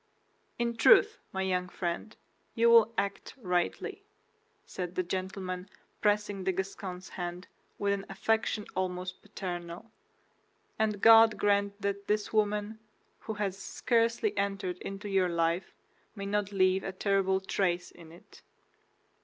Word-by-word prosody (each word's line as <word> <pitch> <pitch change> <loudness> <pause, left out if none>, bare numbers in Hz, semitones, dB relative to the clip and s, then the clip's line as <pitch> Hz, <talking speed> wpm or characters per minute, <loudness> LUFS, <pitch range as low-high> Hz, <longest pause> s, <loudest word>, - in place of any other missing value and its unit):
"In 235 0 -1
truth, 485 - +6
my 190 0 -2
young 180 -1 -1
friend, 175 +5 -4 0.4
you 235 0 +5
will 230 -1 +7
act 200 0 -3
rightly," 180 - -2 0.6
said 180 -1 -5
the 185 - +1
gentleman, 185 0 -4 0.3
pressing 205 -2 +1
the 190 - +1
Gascon's 190 0 -5
hand 175 0 -6 0.3
with 200 0 +1
an 195 -1 -4
affection 215 +2 0
almost 180 0 -3
paternal; 180 0 -6 0.9
"and 210 -2 0
God 225 -1 +8
grant 200 0 +1
that 200 0 -2
this 210 +1 0
woman, 210 0 0 0.4
who 220 - -5
has 200 -2 -2
scarcely 230 -1 0
entered 195 -3 -2
into 195 +2 -6
your 190 -2 +2
life, 170 +1 0 0.4
may 200 -2 -5
not 205 0 -1
leave 190 -1 +3
a 195 - -3
terrible 190 0 +1
trace 180 -2 -1
in 165 -2 -14
it!" 170 - -17
195 Hz, 130 wpm, -30 LUFS, 185-210 Hz, 0.9 s, God